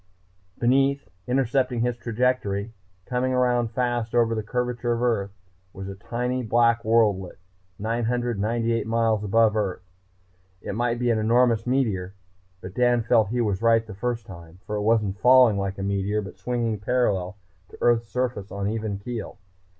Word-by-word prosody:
Beneath, 135 Hz, +1 st, +2 dB, 0.2 s
intercepting 125 Hz, -1 st, +1 dB
his 120 Hz, 0 st, 0 dB
trajectory, 115 Hz, -3 st, -1 dB, 0.3 s
coming 130 Hz, +1 st, -1 dB
around 125 Hz, -2 st, +2 dB
fast 120 Hz, -1 st, -2 dB
over 115 Hz, -1 st, +3 dB
the 110 Hz, -, -1 dB
curvature 120 Hz, +1 st, -2 dB
of 120 Hz, +1 st, -2 dB
Earth, 110 Hz, -5 st, +1 dB, 0.4 s
was 95 Hz, 0 st, -7 dB
a 95 Hz, -, -5 dB
tiny 125 Hz, +5 st, -3 dB
black 115 Hz, 0 st, +2 dB
worldlet, 105 Hz, -5 st, +2 dB, 0.4 s
998 115 Hz, 0 st, -1 dB
miles 115 Hz, -2 st, +1 dB
above 110 Hz, +1 st, +3 dB
Earth. 95 Hz, -4 st, -2 dB, 0.8 s
It -, -, -6 dB
might 120 Hz, +2 st, 0 dB
be 120 Hz, 0 st, +1 dB
an 110 Hz, -, +1 dB
enormous 115 Hz, +1 st, +2 dB
meteor, 105 Hz, -8 st, 0 dB, 0.5 s
but 95 Hz, 0 st, -8 dB
Dan 120 Hz, -1 st, +2 dB
felt 115 Hz, -2 st, +3 dB
he 120 Hz, +2 st, 0 dB
was 105 Hz, -3 st, -1 dB
right 115 Hz, -1 st, +3 dB
the 110 Hz, -, -9 dB
first 120 Hz, +2 st, -3 dB
time. 85 Hz, -2 st, -12 dB
For 105 Hz, -, -4 dB
it 105 Hz, -, -1 dB
wasn't 105 Hz, -2 st, +1 dB
falling 125 Hz, -4 st, +6 dB
like 100 Hz, 0 st, -3 dB
a 95 Hz, -, -4 dB
meteor 100 Hz, +2 st, -1 dB
but 95 Hz, -, -11 dB
swinging 115 Hz, -3 st, -2 dB
parallel 100 Hz, -4 st, 0 dB, 0.3 s
to -, -, -13 dB
Earth's 120 Hz, -1 st, +2 dB
surface 125 Hz, -6 st, -3 dB
on 100 Hz, 0 st, -3 dB
even 110 Hz, -2 st, -3 dB
keel. 115 Hz, -1 st, -6 dB
115 Hz, 160 wpm, -24 LUFS, 105-120 Hz, 0.8 s, falling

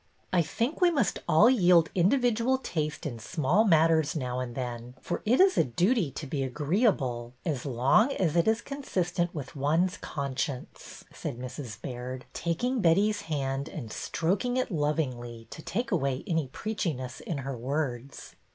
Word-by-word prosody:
^' -, -, -39 dB, 0.3 s
I 180 Hz, -, +5 dB
think 230 Hz, -, -2 dB
we 360 Hz, -, +6 dB
must 275 Hz, -, +1 dB
all 170 Hz, +8 st, +7 dB
yield 180 Hz, -9 st, +5 dB
individual 240 Hz, +6 st, +2 dB
taste 155 Hz, -9 st, -3 dB
in 120 Hz, -6 st, -4 dB
small 155 Hz, -, +2 dB
matters 160 Hz, -4 st, +4 dB
now 125 Hz, -4 st, -2 dB
and 125 Hz, -2 st, -4 dB
then, 125 Hz, -1 st, -5 dB
for 175 Hz, -, -4 dB
it 245 Hz, +4 st, +4 dB
is 380 Hz, 0 st, +5 dB
a -, -, +6 dB
duty 180 Hz, -, +1 dB
to 145 Hz, -, -7 dB
be 140 Hz, 0 st, -3 dB
agreeable 135 Hz, -, 0 dB
as 145 Hz, -5 st, -2 dB
long 135 Hz, -, +3 dB
as 170 Hz, -, 0 dB
it 170 Hz, +2 st, +3 dB
is 220 Hz, +1 st, +3 dB
consistent 180 Hz, -11 st, -2 dB
with 145 Hz, 0 st, -6 dB
one's 160 Hz, +6 st, +1 dB
conscience," 140 Hz, -2 st, -5 dB
said -, -, -5 dB
Mrs. 125 Hz, -3 st, -7 dB
Baird, 125 Hz, 0 st, -6 dB
taking 235 Hz, +9 st, -1 dB
Betty's 205 Hz, +5 st, +3 dB
hand 140 Hz, -2 st, -2 dB
and 120 Hz, -8 st, -7 dB
stroking 200 Hz, +9 st, -1 dB
it 255 Hz, -3 st, -1 dB
lovingly 130 Hz, -7 st, -2 dB
to -, -, -8 dB
take 230 Hz, +9 st, -3 dB
away 140 Hz, -7 st, 0 dB
any 165 Hz, -7 st, 0 dB
preachi 200 Hz, +2 st, -2 dB
ness 125 Hz, 0 st, -7 dB
in 165 Hz, -, -4 dB
her 135 Hz, 0 st, -4 dB
words. 135 Hz, 0 st, -4 dB
155 Hz, 165 wpm, -28 LUFS, 130-195 Hz, 0.3 s, all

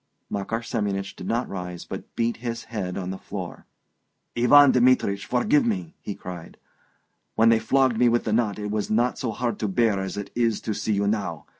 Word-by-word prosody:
Makar 105 Hz, +3 st, -2 dB
Semyonich 100 Hz, -4 st, -2 dB
did -, -, -8 dB
not 120 Hz, +2 st, 0 dB
rise, 90 Hz, -2 st, -6 dB
but -, -, -8 dB
beat 115 Hz, 0 st, 0 dB
his 115 Hz, 0 st, -4 dB
head 95 Hz, -5 st, -4 dB
on 95 Hz, -1 st, -3 dB
the 95 Hz, -, -6 dB
floor. -, -, -7 dB, 0.7 s
"Ivan 135 Hz, +4 st, +7 dB
Dmitrich, 125 Hz, -6 st, +3 dB
forgive 215 Hz, -, +3 dB
me!" 185 Hz, -8 st, -2 dB
he 100 Hz, -, -5 dB
cried. 90 Hz, -2 st, -9 dB, 0.8 s
"When 115 Hz, +1 st, +5 dB
they 115 Hz, -1 st, +5 dB
flogged 130 Hz, +1 st, +2 dB
me 125 Hz, -1 st, +5 dB
with 120 Hz, 0 st, +2 dB
the 110 Hz, -, -1 dB
knot 110 Hz, -3 st, +1 dB
it 105 Hz, -1 st, -4 dB
was 105 Hz, -1 st, -2 dB
not 120 Hz, +3 st, +1 dB
so 125 Hz, -, -2 dB
hard 120 Hz, 0 st, -2 dB
to 105 Hz, -, -1 dB
bear 105 Hz, 0 st, +2 dB
as 95 Hz, 0 st, -4 dB
it 100 Hz, -1 st, -5 dB
is 115 Hz, -3 st, +1 dB
to 110 Hz, -, -2 dB
see 110 Hz, -, -1 dB
you 100 Hz, 0 st, +1 dB
now 100 Hz, -7 st, -2 dB
110 Hz, 200 wpm, -25 LUFS, 100-120 Hz, 0.8 s, Ivan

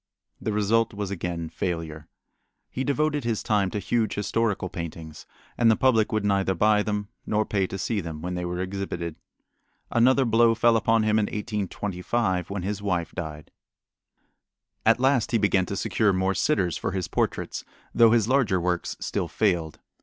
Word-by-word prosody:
The 110 Hz, -, -2 dB
result 105 Hz, +2 st, +1 dB
was 100 Hz, -1 st, -4 dB
again 85 Hz, -3 st, -3 dB
failure. 80 Hz, -2 st, -4 dB, 0.6 s
He 130 Hz, -, -2 dB
devoted 145 Hz, +1 st, 0 dB
his 115 Hz, -2 st, -1 dB
time 100 Hz, -3 st, +1 dB
to 105 Hz, -, -4 dB
huge 110 Hz, +2 st, 0 dB
historical 105 Hz, -1 st, 0 dB
paintings, 80 Hz, -3 st, -8 dB, 0.3 s
and 115 Hz, -2 st, +5 dB
the 110 Hz, -, +5 dB
public 120 Hz, -2 st, +3 dB
would 110 Hz, -2 st, 0 dB
neither 100 Hz, -1 st, +1 dB
buy 105 Hz, +3 st, +3 dB
them 105 Hz, -1 st, -3 dB, 0.2 s
nor 105 Hz, 0 st, +1 dB
pay 100 Hz, -3 st, 0 dB
to 95 Hz, -, -5 dB
see 105 Hz, +2 st, -1 dB
them 80 Hz, -3 st, -6 dB
when 90 Hz, +1 st, -3 dB
they 90 Hz, 0 st, -3 dB
were 90 Hz, 0 st, -3 dB
exhibited. 90 Hz, -3 st, -4 dB, 0.8 s
Another 130 Hz, +3 st, +4 dB
blow 115 Hz, 0 st, +4 dB
fell 115 Hz, 0 st, +4 dB
upon 115 Hz, 0 st, +3 dB
him 110 Hz, 0 st, +3 dB
in 105 Hz, -, +2 dB
1825 100 Hz, -2 st, -2 dB
when 100 Hz, -2 st, -4 dB
his 100 Hz, +1 st, -3 dB
wife 90 Hz, -5 st, -1 dB
died. 75 Hz, -4 st, -7 dB, 1.4 s
At 115 Hz, +2 st, +5 dB
last 130 Hz, -3 st, +2 dB
he -, -, +5 dB
began 100 Hz, -3 st, +2 dB
to 100 Hz, -, -3 dB
secure 105 Hz, +1 st, +1 dB
more 95 Hz, +1 st, +1 dB
sitters 90 Hz, -3 st, +1 dB
for -, -, -3 dB
his 95 Hz, -3 st, -2 dB
portraits, -, -, -2 dB, 0.3 s
though 115 Hz, -1 st, +6 dB
his 110 Hz, -2 st, +3 dB
larger 125 Hz, -8 st, +2 dB
works 90 Hz, 0 st, -2 dB
still -, -, -2 dB
failed. 85 Hz, -7 st, 0 dB
100 Hz, 170 wpm, -25 LUFS, 90-115 Hz, 1.4 s, though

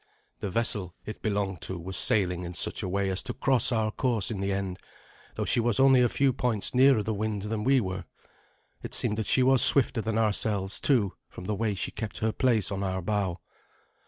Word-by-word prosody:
The 100 Hz, -, -4 dB
vessel 95 Hz, -4 st, 0 dB
it 110 Hz, -, -8 dB
belonged 100 Hz, -4 st, -3 dB
to 95 Hz, -, -4 dB
was 95 Hz, +3 st, -5 dB
sailing 90 Hz, -4 st, +3 dB
in 90 Hz, 0 st, -7 dB
such -, -, 0 dB
a 95 Hz, -, -4 dB
way 100 Hz, +1 st, -1 dB
as 95 Hz, -, +2 dB
to 125 Hz, -2 st, -6 dB
cross 130 Hz, -2 st, +3 dB
our 110 Hz, -2 st, 0 dB
course 115 Hz, -4 st, -1 dB
in 105 Hz, -, -5 dB
the 100 Hz, 0 st, -2 dB
end, 95 Hz, -2 st, -4 dB, 0.6 s
though -, -, -3 dB
she -, -, +1 dB
was 120 Hz, +1 st, +1 dB
only 135 Hz, -1 st, +5 dB
a 120 Hz, -, +2 dB
few 135 Hz, +1 st, +1 dB
points 115 Hz, -4 st, -1 dB
nearer 130 Hz, -3 st, +4 dB
the 110 Hz, -, -3 dB
wind 105 Hz, -1 st, -3 dB
than 105 Hz, 0 st, -4 dB
we 135 Hz, +2 st, +3 dB
were. 95 Hz, -4 st, -5 dB, 0.8 s
It -, -, -3 dB
seemed 105 Hz, +1 st, +1 dB
that 110 Hz, -, -3 dB
she 130 Hz, -, +3 dB
was 130 Hz, -2 st, +4 dB
swifter 125 Hz, -3 st, +4 dB
than 110 Hz, 0 st, -3 dB
ourselves, 105 Hz, -3 st, 0 dB
too, 115 Hz, -9 st, +1 dB, 0.2 s
from 90 Hz, -, -11 dB
the 105 Hz, -, -2 dB
way 105 Hz, 0 st, -2 dB
she -, -, -4 dB
kept 105 Hz, -1 st, -6 dB
her 110 Hz, 0 st, -1 dB
place 115 Hz, -6 st, +1 dB
on 100 Hz, 0 st, -4 dB
our 95 Hz, -2 st, -3 dB
bow. 100 Hz, -3 st, -2 dB
105 Hz, 215 wpm, -27 LUFS, 95-115 Hz, 0.8 s, only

